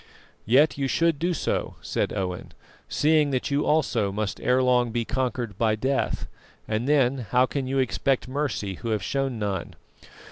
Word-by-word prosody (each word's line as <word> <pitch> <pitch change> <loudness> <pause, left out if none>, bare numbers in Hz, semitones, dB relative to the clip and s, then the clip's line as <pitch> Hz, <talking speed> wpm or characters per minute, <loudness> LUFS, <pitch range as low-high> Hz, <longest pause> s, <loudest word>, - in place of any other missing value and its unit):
"Yet 140 +6 +4
you 135 - +1
should 165 +1 +1
do 175 +2 +1
so," 165 - -2
said - - -2
Owen, 90 -2 -4 0.4
"seeing 150 -1 +3
that 130 +1 -1
you 145 +1 +1
also 120 -10 +1
must 105 0 -3
ere 125 +1 +3
long 125 -1 +3
be 120 0 -1
conquered 125 -4 -2
by 110 -2 +3
death, 130 +5 -1 0.4
and 110 +5 -1
then 135 -5 +2
how 125 +3 +4
can 135 0 -3
you 135 +1 -1
expect 130 0 0
mercy 130 -7 -2
who 115 - -3
have 105 -4 0
shown 135 +1 -1
none?" 100 -4 -3
130 Hz, 170 wpm, -25 LUFS, 110-140 Hz, 0.4 s, Yet